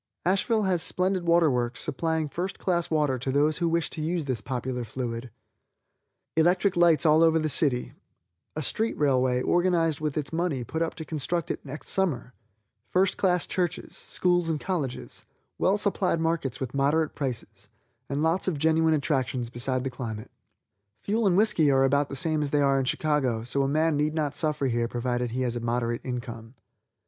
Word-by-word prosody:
Asheville 205 +4 +2
has 185 -3 +1
splendid 180 0 -1
water 170 -2 +4
works 120 -1 -1
supplying 160 +1 -1
first 180 +7 -4
class 175 -3 0
water 150 -5 +1
to 130 +2 -2
those 150 +3 +2
who 170 -1 +1
wish 170 0 +1
to 160 - -5
use 165 0 -1
this 130 -6 -2
popular 125 +1 -3
fluid; 120 +1 -5 1.1
electric 180 +4 +3
lights 170 -4 +4
all 155 +1 +5
over 165 -1 +5
the 155 -1 0
city, 135 -4 +1 0.6
a 155 - -3
street 225 - -1
railway 130 -3 +2
organized 175 -3 +2
with 150 -1 -2
its 150 +1 -3
money 160 -6 -1
put 160 +7 -4
up 165 - -1
to 160 - -7
construct 160 +2 -2
it - - -5
next 145 +2 -8
summer, 140 -10 -1 0.6
first 185 +1 +2
class 180 -2 +1
churches, 175 -2 -3
schools 175 -2 0
and 155 -2 -1
colleges, 155 -9 -4 0.4
well 195 +2 +3
supplied 200 -4 0
markets 160 -6 -1
with 130 -2 -4
moderate 145 +3 +1
prices, 115 -7 -5 0.4
and 140 +2 -1
lots 165 +4 +1
of 175 -5 0
genuine 160 +1 +3
attractions 130 -5 -1
beside 125 +1 -1
the 135 - -3
climate. 110 -4 -6 0.7
Fuel 215 +1 +1
and 180 -1 +3
whiskey 205 -8 +4
are 135 -1 +4
about 140 +1 +2
the - - -5
same 155 +2 +1
that 145 - -1
they 145 - +2
are 135 -1 +3
in 135 - -1
Chicago, 130 -6 0
so 130 +4 -1
a 135 - +1
man 155 +2 +1
need 150 +1 0
not 150 -3 -1
suffer 150 -1 -1
here 120 -2 0
provided 120 0 -2
he 125 +3 -3
has 120 -1 -1
a - - -2
moderate 120 0 -2
income. 120 -1 -6
150 Hz, 185 wpm, -27 LUFS, 130-170 Hz, 1.1 s, all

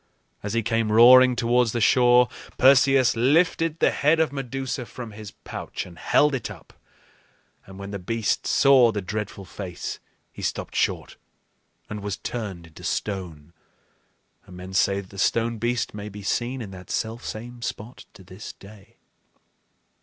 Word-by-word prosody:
As 100 +1 -4
he 115 -1 0
came 115 -1 0
roaring 125 +3 +7
towards 120 -1 +2
the 120 - -1
shore, 125 +1 +5 0.3
Perseus 135 -1 +5
lifted 160 +5 +2
the - - +3
head 155 +3 +2
of 160 -3 +2
Medusa 135 -2 -4
from 120 -3 -8
his 105 0 -9
pouch - - -7
and 85 -3 -14
held 150 0 +3
it 120 -6 -3
up; 95 -7 -13 0.9
and 95 0 -12
when 100 0 -7
the 100 - -5
beast 110 +4 -1
saw 130 -4 +5
the 105 -3 -4
dreadful 105 0 -5
face 90 -1 -7 0.3
he - - -11
stopped - - -3
short - - -1 0.7
and 105 - -6
was 100 -1 -4
turned 100 -8 -6
into 80 -1 -15
stone; 85 -6 -4 0.9
and 90 - -12
men 90 +1 -9
say 100 +1 +2
that 95 - -17
the 100 - -9
stone 115 +2 0
beast 120 0 -1
may 105 0 -7
be 105 0 -10
seen 120 +5 -2
in 100 - -9
that 90 -1 -12
selfsame 120 +1 -5
spot 120 0 -7
to 95 - -14
this 95 +4 -10
day. 100 0 -16
115 Hz, 160 wpm, -24 LUFS, 100-125 Hz, 0.9 s, roaring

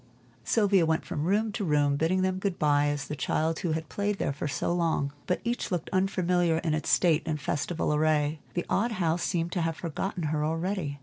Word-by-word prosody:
Sylvia 200 -5 +3
went 160 0 +1
from 150 - -3
room 210 +4 +1
to 205 - -3
room 145 -4 +2
bidding 170 +5 +1
them 185 0 0
good 190 -2 -2
by 145 -1 +3
as 145 -1 -1
the 150 - -4
child 160 +3 0
who 170 -3 -1
had 160 0 -3
played 205 +3 -1
there 140 - -1
so 145 +4 -1
long. 160 -5 0
But 180 - 0
each 240 +1 -2
looked 175 -3 -2
unfamiliar 180 -3 +2
in 160 -1 -1
its 155 - -2
state 165 -3 +4
and 155 -2 -1
festival 150 +3 -1
array, 150 0 +1
and - - -30
the 175 - -1
old 230 +3 +1
house 170 -4 0
seemed 170 -2 -1
to 175 - -1
have 165 -1 -1
forgotten 180 +2 -3
her 150 -1 0
already. 165 -2 -2
165 Hz, 210 wpm, -28 LUFS, 150-185 Hz, -, state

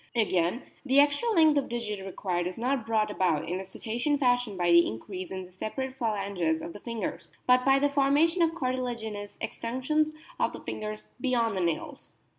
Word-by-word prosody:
Again, 190 0 +1 0.2
the 275 0 +4
extra 290 +11 +3
length 315 -8 +5
of 275 - -5
digit 215 -5 -3
required 180 -2 -2
is 180 - -6
not 250 0 -1
brought 215 -2 +1
about 175 -7 +1
in 180 +2 -2
the 190 - -6
Cetacean 235 +9 -1
fashion 245 -6 +1
by 175 -1 +2
the 170 0 +7
increase 180 - -6
in 190 -1 -5
the 180 - -17
separate 260 +7 -4
phalanges 200 -8 0
of 170 - -6
the - - -9
fingers, 220 -7 -5 0.2
but 250 0 +5
by 270 0 +5
the 285 +1 +3
formation 290 +5 +3
of 330 0 +3
cartilaginous 240 -7 -3
extensions 260 +8 -1 0.3
of - - +1
the - - -8
fingers 215 0 -5
beyond 235 -5 +1
the 190 - 0
nails. 170 -2 -3
230 Hz, 185 wpm, -28 LUFS, 190-270 Hz, 0.3 s, the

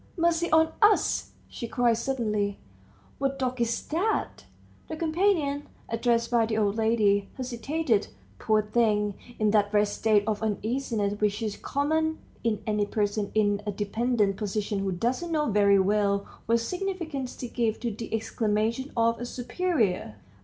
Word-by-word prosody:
"Mercy 340 0 +1
on 320 0 +5
us!" 420 0 +3
she 235 - -6
cried 240 0 +2
suddenly; 215 -5 -1 0.6
"what 275 0 0
dog 255 -2 -2
is 235 0 0
that?" 370 +8 -1 0.4
The 320 - -5
companion, 315 -4 +1 0.2
addressed 230 0 +1
by 230 -2 +3
the 220 -1 -1
old 205 -2 +1
lady, 215 -3 +2
hesitated, 255 -1 -1 0.3
poor 215 -1 +2
thing, 210 -2 +1 0.2
in 215 -1 +2
that 205 -1 +3
wretched 210 -1 +3
state 215 -2 +3
of 215 -1 -1
uneasiness 220 -1 -1
which 210 +1 +1
is 210 -2 -2
common 315 +3 0 0.3
in 225 -3 0
any 210 -1 0
person 205 -1 -1
in 205 -1 +2
a - - +1
dependent 210 0 0
position 210 0 -2
who 195 -1 -1
doesn't 250 - -1
know 300 -6 +1
very 200 -1 +5
well 200 0 +2 0.2
what 230 +1 +3
significance 335 -4 -3
to 250 - -6
give 230 -2 -1
to 235 - -1
the 220 +2 -7
exclamation 225 +3 -1
of 230 0 +2
a - - -2
superior. 245 - -1
230 Hz, 150 wpm, -27 LUFS, 210-270 Hz, 0.6 s, on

